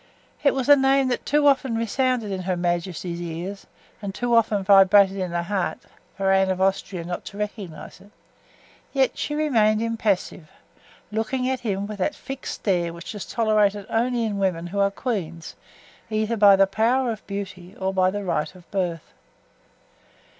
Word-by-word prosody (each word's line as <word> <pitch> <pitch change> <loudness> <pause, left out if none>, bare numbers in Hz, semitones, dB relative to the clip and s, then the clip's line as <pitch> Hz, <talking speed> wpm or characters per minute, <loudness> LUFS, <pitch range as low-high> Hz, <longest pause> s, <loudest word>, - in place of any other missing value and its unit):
It 280 - +4
was 265 -2 -1
a 290 - +9
name 270 -1 +3
that 245 - -3
too 295 +1 +3
often 270 -4 +3
resounded 230 -1 0
in 190 -1 -3
her 180 0 -2
majesty's 175 0 -2
ears 175 +4 -6 0.3
and 200 -1 -5
too 245 -1 -1
often 215 -3 +3
vibrated 195 0 +6
in 185 -2 -2
her 170 0 -2
heart 190 0 -2 0.4
for 195 -1 +1
Anne 190 0 +3
of 185 -1 -1
Austria 190 -2 0
not 175 +1 -5
to 200 - -9
recognize 205 -6 -6
it; 205 - -17 0.8
yet 270 -2 +2
she 295 - -3
remained 225 -9 +2
impassive, 220 -8 -1 0.6
looking 225 +4 -1
at 260 -1 -1
him 200 -3 -2
with 210 0 -7
that 290 +10 0
fixed 270 +1 -6
stare 175 -4 0
which 170 +4 -8
is 205 - -7
tolerated 210 -3 +1
only 235 +1 +1
in 205 -2 -2
women 180 -3 0
who 195 +3 -4
are 200 0 +4
queens, 185 -7 -4 0.6
either 215 +1 0
by 205 -2 +7
the 195 0 +5
power 235 +5 +1
of 220 - -8
beauty 190 -2 -7
or 190 0 -1
by 185 -1 +3
the 205 +2 -4
right 160 -2 -2
of 180 -2 -18
birth. 175 -5 -3
200 Hz, 175 wpm, -24 LUFS, 185-230 Hz, 0.8 s, a